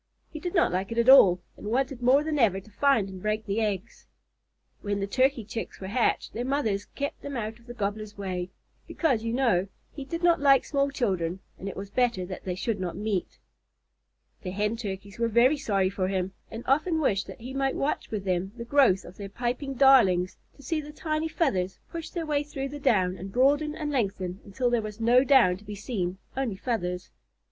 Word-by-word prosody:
He 310 Hz, -, -6 dB
did 355 Hz, +4 st, -4 dB
not 340 Hz, -, +4 dB
like 190 Hz, +4 st, -2 dB
it 230 Hz, -, -4 dB
at 235 Hz, +2 st, +4 dB
all, 185 Hz, -10 st, +8 dB
and -, -, -9 dB
wanted 255 Hz, +2 st, -1 dB
more 260 Hz, +4 st, +5 dB
than 305 Hz, -1 st, -1 dB
ever 200 Hz, -6 st, +3 dB
to 215 Hz, +3 st, -17 dB
find 265 Hz, -3 st, +2 dB
and 190 Hz, -1 st, -9 dB
break 215 Hz, +1 st, -1 dB
the 205 Hz, +2 st, -1 dB
eggs. 210 Hz, 0 st, -3 dB, 0.7 s
When 205 Hz, -1 st, -2 dB
the 195 Hz, -, -1 dB
Turkey 255 Hz, +3 st, +1 dB
Chicks 225 Hz, +1 st, -6 dB
were 190 Hz, -, -7 dB
hatched, 235 Hz, +3 st, 0 dB
their 235 Hz, -, -3 dB
mothers 245 Hz, -7 st, 0 dB
kept 285 Hz, +2 st, -5 dB
them 280 Hz, -2 st, -5 dB
out 220 Hz, 0 st, -4 dB
of 235 Hz, -, -22 dB
the 240 Hz, -, -8 dB
Gobbler's 210 Hz, -1 st, -4 dB
way, 185 Hz, -2 st, -3 dB, 0.4 s
because, 260 Hz, -10 st, 0 dB
you 230 Hz, -, -1 dB
know, 230 Hz, -7 st, +2 dB, 0.2 s
he 285 Hz, -, -7 dB
did 335 Hz, +5 st, -5 dB
not 340 Hz, -2 st, +4 dB
like 275 Hz, -2 st, +5 dB
small 280 Hz, -1 st, +1 dB
children 190 Hz, -10 st, -1 dB, 0.2 s
and 195 Hz, -, -4 dB
it -, -, -8 dB
was 195 Hz, +1 st, -7 dB
better 240 Hz, -7 st, +1 dB
that 185 Hz, 0 st, -8 dB
they 180 Hz, -1 st, -2 dB
should 205 Hz, +2 st, -2 dB
not 180 Hz, -2 st, -3 dB
meet. 205 Hz, -3 st, -2 dB, 1.0 s
The 185 Hz, -, -5 dB
Hen 210 Hz, +4 st, -1 dB
Turkeys 200 Hz, -2 st, -6 dB
were 230 Hz, -, +2 dB
very 235 Hz, +6 st, +4 dB
sorry 195 Hz, -7 st, +1 dB
for 185 Hz, -1 st, -1 dB
him, 190 Hz, 0 st, -2 dB, 0.2 s
and 225 Hz, +2 st, -7 dB
often 315 Hz, +5 st, +2 dB
wished 205 Hz, -10 st, +1 dB
that -, -, -10 dB
he 255 Hz, +3 st, -7 dB
might 270 Hz, 0 st, 0 dB
watch 285 Hz, -, -1 dB
with 210 Hz, -3 st, -3 dB
them 185 Hz, +1 st, -1 dB
the 235 Hz, -, -6 dB
growth 240 Hz, -8 st, +4 dB
of 180 Hz, -, -12 dB
their 200 Hz, -1 st, -7 dB
piping 250 Hz, +5 st, -3 dB
darlings, 215 Hz, -10 st, +5 dB, 0.2 s
to 280 Hz, -, -16 dB
see 310 Hz, +4 st, -1 dB
the 300 Hz, 0 st, -10 dB
tiny 310 Hz, 0 st, -2 dB
feathers 195 Hz, -, 0 dB
push 330 Hz, -1 st, -5 dB
their 335 Hz, -2 st, -4 dB
way 295 Hz, -2 st, +1 dB
through 275 Hz, -2 st, -5 dB
the 290 Hz, +1 st, -7 dB
down 185 Hz, -8 st, +2 dB
and 190 Hz, +2 st, -7 dB
broaden 290 Hz, +6 st, +2 dB
and 300 Hz, -2 st, -3 dB
lengthen 195 Hz, -7 st, -2 dB
until 240 Hz, +5 st, -1 dB
there 240 Hz, -2 st, +2 dB
was 215 Hz, 0 st, -7 dB
no 240 Hz, +3 st, +5 dB
down 260 Hz, -10 st, +5 dB
to 200 Hz, -, -17 dB
be 210 Hz, 0 st, -7 dB
seen 190 Hz, -4 st, -3 dB, 0.2 s
only 260 Hz, -6 st, -1 dB
feathers. 185 Hz, -5 st, -3 dB
230 Hz, 215 wpm, -27 LUFS, 195-275 Hz, 1.0 s, all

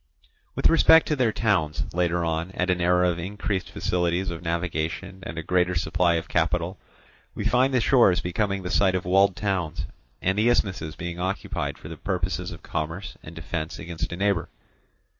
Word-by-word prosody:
With -, -, +3 dB
respect 165 Hz, 0 st, +6 dB
to 150 Hz, -, +2 dB
their 125 Hz, -5 st, +2 dB
towns, 95 Hz, -10 st, +1 dB
later 85 Hz, 0 st, +1 dB
on, 80 Hz, +2 st, -1 dB
at 90 Hz, 0 st, 0 dB
an 90 Hz, -1 st, 0 dB
era 90 Hz, +1 st, +3 dB
of 85 Hz, -, -5 dB
increased 100 Hz, +1 st, -3 dB
facilities 90 Hz, +1 st, -1 dB
of 85 Hz, 0 st, -6 dB
navigation 85 Hz, +2 st, -3 dB
and 85 Hz, -, -7 dB
a 80 Hz, -, -3 dB
greater 90 Hz, +1 st, +1 dB
supply 85 Hz, +1 st, +2 dB
of 80 Hz, +1 st, -2 dB
capital, 85 Hz, +3 st, 0 dB, 0.6 s
we -, -, -4 dB
find 130 Hz, +2 st, +3 dB
the 130 Hz, -, +3 dB
shores 115 Hz, -6 st, +4 dB
becoming 100 Hz, +2 st, -1 dB
the 90 Hz, -, -4 dB
site 95 Hz, -2 st, +3 dB
of 90 Hz, -, -2 dB
walled 95 Hz, +1 st, +4 dB
towns, 90 Hz, -6 st, -2 dB, 0.3 s
and 95 Hz, +3 st, 0 dB
the 115 Hz, +3 st, +4 dB
isthmuses 90 Hz, -9 st, 0 dB
being 85 Hz, 0 st, -5 dB
occupied 95 Hz, +2 st, -3 dB
for -, -, -11 dB
the 80 Hz, 0 st, -8 dB
purposes 90 Hz, -1 st, -2 dB
of 85 Hz, -, -10 dB
commerce 80 Hz, +4 st, -4 dB
and 80 Hz, -, -11 dB
defence 80 Hz, 0 st, -4 dB
against 80 Hz, -1 st, -5 dB
a 85 Hz, -, -4 dB
neighbour. 100 Hz, -3 st, 0 dB
90 Hz, 180 wpm, -25 LUFS, 85-95 Hz, 0.6 s, respect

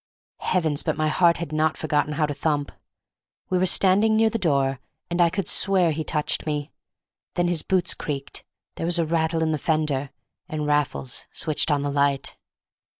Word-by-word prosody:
Heavens, 160 Hz, -5 st, 0 dB
but -, -, -2 dB
my 155 Hz, 0 st, +1 dB
heart 170 Hz, +2 st, +3 dB
had 170 Hz, -3 st, -5 dB
not 155 Hz, 0 st, +1 dB
forgotten 150 Hz, -1 st, 0 dB
how 150 Hz, +1 st, +1 dB
to 145 Hz, -, -3 dB
thump! 145 Hz, -1 st, -1 dB, 0.8 s
We 185 Hz, -, +2 dB
were 185 Hz, -, +2 dB
standing 200 Hz, +5 st, +5 dB
near 220 Hz, 0 st, +3 dB
the 230 Hz, -, -2 dB
door, 140 Hz, -7 st, +1 dB, 0.3 s
and 175 Hz, +1 st, +1 dB
I 170 Hz, -, +5 dB
could 185 Hz, 0 st, -3 dB
swear 185 Hz, -4 st, +2 dB
he 155 Hz, +1 st, -2 dB
touched 150 Hz, 0 st, -1 dB
me; 150 Hz, 0 st, -2 dB, 0.6 s
then 175 Hz, 0 st, +1 dB
his 175 Hz, -3 st, +1 dB
boots 185 Hz, +1 st, +1 dB
creaked, 140 Hz, -2 st, -5 dB, 0.3 s
there 165 Hz, -, -2 dB
was 175 Hz, 0 st, +2 dB
a 165 Hz, -, +1 dB
rattle 160 Hz, 0 st, 0 dB
in 160 Hz, -, +1 dB
the 155 Hz, -, -1 dB
fender—and 150 Hz, 0 st, -3 dB
Raffles 145 Hz, -3 st, -1 dB
switched 155 Hz, 0 st, 0 dB
on 145 Hz, -2 st, +1 dB
the 145 Hz, -, -1 dB
light. 140 Hz, -1 st, 0 dB
155 Hz, 180 wpm, -24 LUFS, 145-175 Hz, 0.8 s, standing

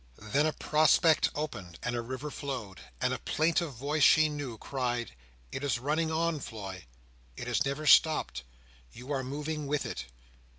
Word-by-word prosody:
Then 140 Hz, +8 st, +1 dB
a 155 Hz, -, 0 dB
prospect 155 Hz, +1 st, +4 dB
opened, 100 Hz, -, -5 dB
and 120 Hz, -, -1 dB
a 120 Hz, -, -1 dB
river 130 Hz, +5 st, -5 dB
flowed, 125 Hz, -11 st, -5 dB, 0.2 s
and -, -, +1 dB
a -, -, -3 dB
plaintive 160 Hz, -1 st, 0 dB
voice 145 Hz, +6 st, -2 dB
she 155 Hz, +2 st, +6 dB
knew, 145 Hz, -6 st, -5 dB
cried, 120 Hz, -1 st, -2 dB, 0.4 s
"It 135 Hz, -, -5 dB
is 135 Hz, -5 st, +1 dB
running 155 Hz, +6 st, 0 dB
on, 165 Hz, -1 st, 0 dB
Floy! 95 Hz, -, -7 dB, 0.5 s
It -, -, -5 dB
has -, -, +1 dB
never 140 Hz, +3 st, -2 dB
stopped! 155 Hz, -, +5 dB, 0.5 s
You 125 Hz, +4 st, -9 dB
are 135 Hz, -2 st, 0 dB
moving 150 Hz, +3 st, -4 dB
with 145 Hz, 0 st, 0 dB
it!" -, -, -5 dB
140 Hz, 165 wpm, -30 LUFS, 120-155 Hz, 0.5 s, she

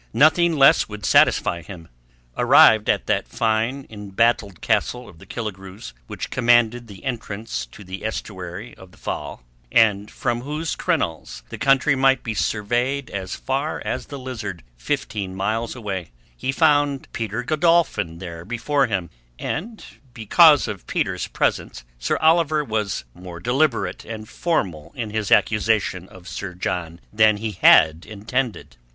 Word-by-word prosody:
Nothing 165 Hz, +2 st, +4 dB
less 135 Hz, -4 st, +5 dB
would 105 Hz, -2 st, -7 dB
satisfy 85 Hz, -, +3 dB
him. 85 Hz, -1 st, -11 dB, 0.5 s
Arrived 110 Hz, -1 st, +6 dB
at -, -, +1 dB
that -, -, 0 dB
fine 115 Hz, +5 st, -1 dB
embattled 105 Hz, -1 st, -1 dB
castle 125 Hz, 0 st, -1 dB
of 80 Hz, -, -15 dB
the -, -, -15 dB
Killigrews 95 Hz, -, -7 dB
which -, -, -6 dB
commanded 120 Hz, -1 st, +3 dB
the 100 Hz, -3 st, -13 dB
entrance 110 Hz, -, -4 dB
to 65 Hz, -, -13 dB
the 95 Hz, 0 st, -8 dB
estuary 95 Hz, -1 st, -6 dB
of 95 Hz, -, -14 dB
the -, -, -21 dB
Fal, -, -, -6 dB, 0.3 s
and 105 Hz, -2 st, +3 dB
from 120 Hz, -2 st, -2 dB
whose 150 Hz, +4 st, -3 dB
crenels 80 Hz, -7 st, -2 dB
the -, -, -8 dB
country 135 Hz, +1 st, +3 dB
might 135 Hz, -1 st, +3 dB
be 115 Hz, -, -3 dB
surveyed 120 Hz, +6 st, -1 dB
as 95 Hz, -2 st, -4 dB
far 135 Hz, +4 st, -2 dB
as -, -, -3 dB
the 140 Hz, -, -7 dB
Lizard, 110 Hz, -, -6 dB
fifteen 95 Hz, -, -3 dB
miles 110 Hz, +5 st, -2 dB
away, 100 Hz, -7 st, -5 dB, 0.3 s
he 130 Hz, -, -2 dB
found 145 Hz, -2 st, +2 dB
Peter 115 Hz, +1 st, -3 dB
Godolphin 155 Hz, -, +1 dB
there 85 Hz, -2 st, -8 dB
before 125 Hz, +6 st, 0 dB
him; 95 Hz, -6 st, -3 dB, 0.3 s
and 215 Hz, -, -5 dB, 0.3 s
because 145 Hz, -, +5 dB
of 100 Hz, -4 st, -7 dB
Peter's -, -, -1 dB
presence 60 Hz, 0 st, -2 dB, 0.2 s
Sir -, -, 0 dB
Oliver 160 Hz, -2 st, +3 dB
was 110 Hz, -6 st, -2 dB
more 90 Hz, -1 st, -10 dB
deliberate 125 Hz, -, 0 dB
and 110 Hz, -1 st, -8 dB
formal 95 Hz, -, -2 dB
in 115 Hz, -5 st, -4 dB
his 105 Hz, -2 st, -2 dB
accusation 105 Hz, -4 st, +2 dB
of 95 Hz, -1 st, -14 dB
Sir 95 Hz, -3 st, -6 dB
John 85 Hz, -2 st, -4 dB
than 110 Hz, -1 st, +4 dB
he 110 Hz, +1 st, -3 dB
had 80 Hz, -4 st, +5 dB
intended. 110 Hz, -, -4 dB
110 Hz, 145 wpm, -22 LUFS, 95-130 Hz, 0.5 s, Arrived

